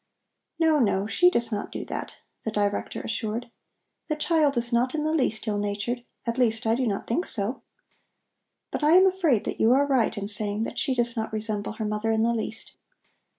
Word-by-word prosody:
"No, 320 -2 +3
no, 200 -5 +2
she 355 +11 +4
does 235 -9 -1
not 205 -1 -3
do - - -5
that," - - -5 0.3
the - - -3
Director 205 -2 -1
assured 230 +1 -3 0.6
"The 305 - 0
child 300 -3 +2
is 235 +1 -1
not 250 +4 +2
in 300 - -1
the 310 +1 0
least 235 -7 0
ill 205 -1 0
natured, 205 +4 -2 0.2
at 235 +1 -2
least, 225 -3 +2
I 225 - +3
do 250 +1 0
not 200 -2 -2
think 300 +11 -1
so. 210 +5 -2 1.1
But - - -3
I 305 +2 +5
am 370 +2 +8
afraid 350 - +2
that - - -4
you 225 +3 +5
are 280 +2 +4
right 260 -6 +1
in 200 0 -3
saying 210 0 -1
that - - -4
she 265 - 0
does 240 -1 0
not 220 -1 -3
resemble 215 -1 -2
her 220 0 -4
mother 210 +1 -1
in 220 0 +2
the 235 +1 +2
least. 220 -1 -4
230 Hz, 205 wpm, -26 LUFS, 215-270 Hz, 1.1 s, am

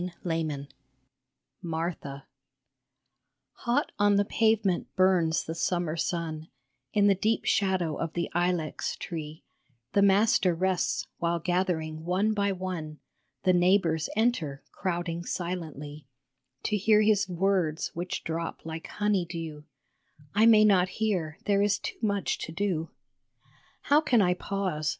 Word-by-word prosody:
MARTHA 175 -1 -6 0.2
1 165 -1 0
1 140 +1 -9 0.9
MARTHA 160 -5 -4 1.3
HOT 245 +5 -1
on 205 0 +4
the 200 0 +3
pavement 220 -4 +1
burns 180 -4 +3
the 160 - -5
summer 170 -1 -1
sun, 160 -2 -3 0.4
In 205 -1 +3
the 200 - +6
deep 215 +4 0
shadow 190 -5 +1
of 165 -1 -3
the 170 -1 -1
ilex 175 -2 -1
tree 155 -2 -7 0.5
The 200 - +4
Master 200 -2 +4
rests, 185 +1 0
while 170 0 +1
gathering 170 -3 -1
one 190 +5 +1
by 200 -1 +1
one 180 -5 -5 0.5
The 185 - +4
neighbors 175 -3 +3
enter, 195 - 0
crowding 175 -2 -3
silently 155 -6 -5 0.6
To 215 - 0
hear 210 +2 +4
His 205 -2 +3
words, 180 -3 0
which 180 +3 -4
drop 165 +1 -4
like 160 0 -6
honey 205 -3 0
dew; 160 -3 -6 0.7
I 215 +3 +5
may 215 -2 +7
not 185 -3 +4
hear, 185 -8 -1
there 200 -1 +3
is 205 -1 +2
too - - -6
much 200 -3 0
to - - -5
do. 165 -2 -1 0.9
How 290 +2 +4
can 255 -7 +3
I 180 -1 +3
pause 180 -5 -2
180 Hz, 135 wpm, -28 LUFS, 165-200 Hz, 1.3 s, may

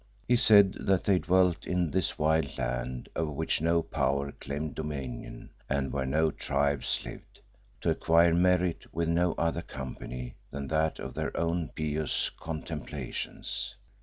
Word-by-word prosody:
He 125 - +5
said 100 -4 +7
that 95 -2 +2
they 95 -3 +3
dwelt 90 -1 +2
in 90 -3 +1
this 95 -2 0
wild 80 +1 +1
land, - - -3
over 80 -1 0
which 80 +1 -1
no 85 0 +3
power 70 -2 0
claimed 70 +1 -5
dominion 70 -6 -6 0.2
and 70 -1 0
where 65 -2 -1
no 80 +3 +2
tribes 70 -1 0
lived, - - -10 0.4
to - - +2
acquire 85 +1 +4
"merit," 90 0 +2
with 85 +1 -1
no 85 +1 +2
other 85 0 0
company 65 -3 -6 0.2
than 70 0 -5
that 80 0 +1
of 65 - -6
their - - -3
own 85 -1 0
pious 75 -2 0
contemplations. 80 -1 -5
80 Hz, 145 wpm, -29 LUFS, 70-85 Hz, 0.4 s, said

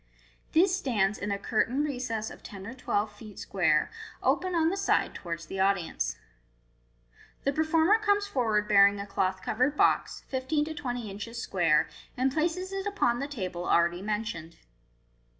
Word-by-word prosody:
This 365 +3 +5
stands 215 - 0
in 205 - -3
a 200 - 0
curtained 245 +7 0
recess 245 -6 -3
of - - -12
ten 195 -2 -9
or 230 - -6
twelve 210 -4 -1
feet 210 -1 -12
square, 160 -6 +1 0.3
open 370 -1 +1
on 325 -1 +3
the 380 - -1
side 395 0 +1
towards 170 -1 -6
the 190 +5 -6
audience. 185 - 0 1.3
The 280 - +1
performer 320 +7 +3
comes 410 -1 +2
forward 220 - 0
bearing 200 -1 +6
a 200 - -4
cloth 190 -1 -1
covered 255 +6 +1
box, - - +2
fifteen 275 +3 0
to 315 - -5
twenty 245 -7 -4
inches 230 +4 -6
square, 170 -8 +2 0.3
and 260 +1 +1
places 345 +5 -1
it 390 +1 -3
upon 240 -13 +1
the 280 - -2
table 185 -10 -4
already 170 +1 +3
mentioned. 205 -6 -3
225 Hz, 160 wpm, -29 LUFS, 195-300 Hz, 1.3 s, bearing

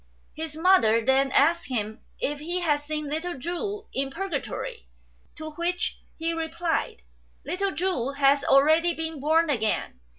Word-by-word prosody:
His 315 -1 -6
mother 275 -11 +4
then 265 +1 +3
asked 335 +6 +3
him 220 -1 -3 0.2
if 290 +1 -2
he 345 +4 -2
had 300 -4 +2
seen 300 0 -4
little 320 +3 -3
Chu 395 - -4
in 270 0 -1
Purgatory; 390 - -4 0.5
to 310 0 -7
which 345 +3 -2 0.2
he 330 +1 -1
replied, 330 - -2 0.2
" - - -36
Little 375 +6 -1
Chu 305 -7 -1
has 280 0 +3
already 315 +6 +4
been 320 -2 -4
born 315 +3 +3
again. 220 - -1
315 Hz, 145 wpm, -26 LUFS, 275-345 Hz, 0.5 s, mother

